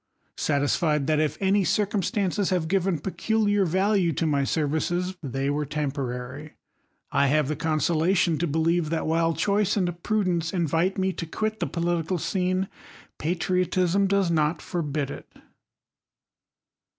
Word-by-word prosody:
Satisfied 150 Hz, +1 st, +1 dB
that 155 Hz, +1 st, +2 dB
if 155 Hz, -1 st, 0 dB
any 195 Hz, +1 st, +2 dB
cir 210 Hz, +3 st, +2 dB
cumstances 200 Hz, -1 st, -1 dB
have 180 Hz, -4 st, 0 dB
given 190 Hz, 0 st, +1 dB
peculiar 205 Hz, +4 st, +1 dB
value 190 Hz, +1 st, +2 dB
to 165 Hz, -, -1 dB
my 145 Hz, -3 st, +1 dB
services, 160 Hz, +6 st, -1 dB
they 135 Hz, -1 st, -2 dB
were 145 Hz, +1 st, 0 dB
temporary, 140 Hz, -1 st, -4 dB, 0.6 s
I 140 Hz, -, +3 dB
have 150 Hz, 0 st, +2 dB
the 155 Hz, -, -1 dB
consolation 160 Hz, +2 st, +1 dB
to 170 Hz, -, 0 dB
believe, 160 Hz, +1 st, +1 dB
that 165 Hz, 0 st, -1 dB
while 165 Hz, 0 st, +1 dB
choice 205 Hz, 0 st, +1 dB
and 175 Hz, -3 st, -1 dB
prudence 180 Hz, -6 st, 0 dB
invite 170 Hz, +2 st, +1 dB
me 190 Hz, 0 st, 0 dB
to 165 Hz, -, -5 dB
quit 215 Hz, +5 st, -2 dB
the 170 Hz, -, -1 dB
political 170 Hz, +2 st, -1 dB
scene, 185 Hz, +2 st, 0 dB, 0.5 s
patriotism 180 Hz, +3 st, +1 dB
does 195 Hz, -3 st, +2 dB
not 155 Hz, 0 st, +1 dB
forbid 150 Hz, -5 st, -3 dB
it. -, -, -10 dB
170 Hz, 140 wpm, -25 LUFS, 155-190 Hz, 0.6 s, I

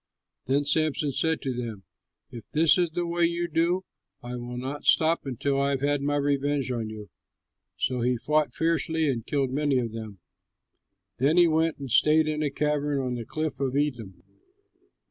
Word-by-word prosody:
Then 140 Hz, +2 st, +1 dB
Samson 150 Hz, -1 st, +1 dB
said 160 Hz, +4 st, 0 dB
to 130 Hz, -, -2 dB
them, 115 Hz, -5 st, -5 dB, 0.5 s
"If 115 Hz, -3 st, -10 dB
this 160 Hz, +3 st, +5 dB
is 175 Hz, -1 st, +2 dB
the 175 Hz, +2 st, -2 dB
way 170 Hz, 0 st, +1 dB
you 170 Hz, +1 st, -1 dB
do, 170 Hz, +3 st, 0 dB, 0.4 s
I 120 Hz, +1 st, -5 dB
will 120 Hz, 0 st, -6 dB
not 135 Hz, +4 st, -5 dB
stop 160 Hz, -2 st, +3 dB
until 135 Hz, +2 st, -1 dB
I 140 Hz, -, +1 dB
have 135 Hz, -2 st, -1 dB
had 145 Hz, 0 st, +1 dB
my 145 Hz, +1 st, 0 dB
revenge 145 Hz, -1 st, 0 dB
on 115 Hz, -3 st, -3 dB
you!" 105 Hz, -4 st, -9 dB, 0.7 s
So 125 Hz, -2 st, -1 dB
he 125 Hz, +1 st, +1 dB
fought 150 Hz, +4 st, +1 dB
fiercely 160 Hz, -1 st, +1 dB
and 120 Hz, -5 st, -1 dB
killed 135 Hz, -3 st, 0 dB
many 145 Hz, 0 st, +1 dB
of 120 Hz, -3 st, -1 dB
them; 110 Hz, -3 st, -7 dB, 1.0 s
then 145 Hz, +7 st, +3 dB
he 175 Hz, -1 st, +7 dB
went 160 Hz, 0 st, +1 dB
and 135 Hz, -3 st, -7 dB
stayed 155 Hz, +5 st, +4 dB
in 155 Hz, 0 st, -1 dB
a 150 Hz, -, +1 dB
cavern 145 Hz, -2 st, -1 dB
in -, -, -2 dB
the 120 Hz, -2 st, -5 dB
cliff 155 Hz, -1 st, -3 dB
of 135 Hz, -1 st, -1 dB
Etam. 115 Hz, -12 st, -2 dB
145 Hz, 185 wpm, -26 LUFS, 125-155 Hz, 1.0 s, he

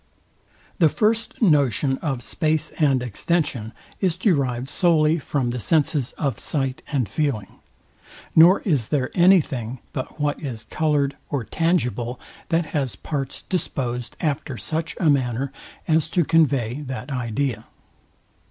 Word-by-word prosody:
The 165 Hz, -3 st, +6 dB
first 220 Hz, +5 st, 0 dB
notion 140 Hz, -, +3 dB
of 135 Hz, -6 st, -3 dB
space 155 Hz, +2 st, -1 dB
and 135 Hz, -5 st, +3 dB
extension 125 Hz, -, -1 dB, 0.3 s
is 180 Hz, -3 st, +1 dB
derived 135 Hz, -, +1 dB
solely 160 Hz, 0 st, +3 dB
from 135 Hz, -4 st, -1 dB
the 125 Hz, -, -3 dB
senses 145 Hz, 0 st, +1 dB
of 135 Hz, -8 st, -2 dB
sight 135 Hz, -3 st, -1 dB
and 130 Hz, -7 st, +1 dB
feeling; 110 Hz, -, -2 dB, 0.8 s
nor 170 Hz, +4 st, +7 dB
is 145 Hz, -, +1 dB
there 135 Hz, -4 st, 0 dB
any 185 Hz, +1 st, +6 dB
thing, 125 Hz, -3 st, -5 dB, 0.2 s
but 130 Hz, +3 st, -5 dB
what 145 Hz, 0 st, -1 dB
is 120 Hz, -7 st, -5 dB
coloured 145 Hz, +3 st, 0 dB
or 140 Hz, -5 st, -1 dB
tangible, 125 Hz, -, -1 dB, 0.3 s
that 165 Hz, 0 st, +2 dB
has 135 Hz, -8 st, -1 dB
parts 135 Hz, +5 st, -4 dB
disposed 125 Hz, -9 st, -3 dB
after 145 Hz, -5 st, -2 dB
such 160 Hz, +5 st, -3 dB
a 170 Hz, -, +2 dB
manner, 130 Hz, -2 st, +1 dB, 0.4 s
as 155 Hz, -1 st, +2 dB
to 170 Hz, -1 st, +2 dB
convey 140 Hz, -6 st, +2 dB
that 130 Hz, +1 st, -5 dB
idea. 125 Hz, -2 st, -2 dB
140 Hz, 135 wpm, -23 LUFS, 125-160 Hz, 0.8 s, nor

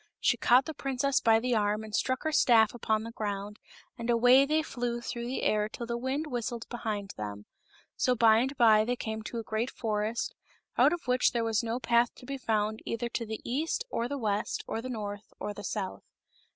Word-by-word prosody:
She -, -, +3 dB
caught 250 Hz, +2 st, +4 dB
the 315 Hz, -, -5 dB
princess 275 Hz, 0 st, 0 dB
by 225 Hz, -1 st, +5 dB
the 250 Hz, +2 st, 0 dB
arm 210 Hz, 0 st, +1 dB
and 215 Hz, -1 st, -10 dB
struck 260 Hz, +4 st, 0 dB
her 315 Hz, -, 0 dB
staff 225 Hz, -7 st, +5 dB
upon 220 Hz, -2 st, 0 dB
the 230 Hz, -, -6 dB
ground, 205 Hz, -2 st, -4 dB, 0.4 s
and 235 Hz, 0 st, -4 dB
away 245 Hz, +3 st, +6 dB
they 310 Hz, +1 st, +2 dB
flew 240 Hz, -4 st, -3 dB
through 235 Hz, 0 st, -5 dB
the 255 Hz, -, -3 dB
air 210 Hz, 0 st, +2 dB
till 235 Hz, -, -6 dB
the 235 Hz, 0 st, -3 dB
wind 260 Hz, +5 st, -2 dB
whistled 240 Hz, -4 st, -4 dB
behind 215 Hz, -5 st, -4 dB
them. 105 Hz, -1 st, -6 dB, 0.5 s
So 250 Hz, -, +2 dB
by 225 Hz, -2 st, +6 dB
and 265 Hz, +4 st, 0 dB
by 215 Hz, -2 st, +6 dB
they 245 Hz, +3 st, -1 dB
came 220 Hz, -2 st, -4 dB
to 225 Hz, +2 st, -6 dB
a 230 Hz, -, -3 dB
great 220 Hz, +3 st, -2 dB
forest, 215 Hz, 0 st, -2 dB, 0.4 s
out -, -, +5 dB
of 345 Hz, -, -3 dB
which 250 Hz, 0 st, +3 dB
there 235 Hz, -1 st, 0 dB
was 225 Hz, -2 st, +1 dB
no 230 Hz, +1 st, -2 dB
path 235 Hz, 0 st, +2 dB
to -, -, -14 dB
be 275 Hz, +1 st, -5 dB
found 215 Hz, -2 st, 0 dB
either 235 Hz, +1 st, -3 dB
to 230 Hz, -1 st, -3 dB
the 220 Hz, 0 st, -5 dB
east 310 Hz, -, -1 dB
or 235 Hz, -, -1 dB
the 285 Hz, +2 st, -3 dB
west 210 Hz, -4 st, -1 dB
or 225 Hz, -, -3 dB
the 255 Hz, -, -6 dB
north 205 Hz, -3 st, -6 dB
or 210 Hz, -, -4 dB
the 205 Hz, -, -9 dB
south. 195 Hz, 0 st, -4 dB
230 Hz, 215 wpm, -29 LUFS, 215-250 Hz, 0.5 s, away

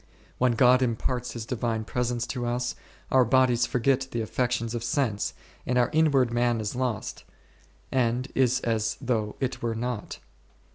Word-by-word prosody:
When 125 Hz, -1 st, +3 dB
God 125 Hz, +1 st, +5 dB
imparts 125 Hz, +1 st, -1 dB
His 115 Hz, -2 st, -5 dB
Divine 115 Hz, -2 st, -2 dB
Presence 120 Hz, 0 st, -1 dB
to 125 Hz, -2 st, -4 dB
us, 125 Hz, +1 st, -1 dB, 0.4 s
our 130 Hz, -1 st, +6 dB
bodies 125 Hz, 0 st, +3 dB
forget 130 Hz, +1 st, +1 dB
the 115 Hz, -, -2 dB
affec 125 Hz, +3 st, 0 dB
tions 115 Hz, -1 st, -1 dB
of 120 Hz, -1 st, -3 dB
sense, 120 Hz, -4 st, -1 dB, 0.3 s
and 125 Hz, -1 st, 0 dB
our 120 Hz, -1 st, +3 dB
outward 140 Hz, -7 st, +3 dB
man 120 Hz, -1 st, +2 dB
is 105 Hz, +1 st, -3 dB
lost, 125 Hz, -4 st, -3 dB, 0.7 s
and 125 Hz, 0 st, +1 dB
is 130 Hz, 0 st, +2 dB
as 110 Hz, -1 st, 0 dB
though 115 Hz, -5 st, -1 dB
it 130 Hz, -2 st, -2 dB
were 115 Hz, -1 st, -1 dB
not. 120 Hz, -1 st, -4 dB
120 Hz, 160 wpm, -27 LUFS, 115-130 Hz, 0.7 s, our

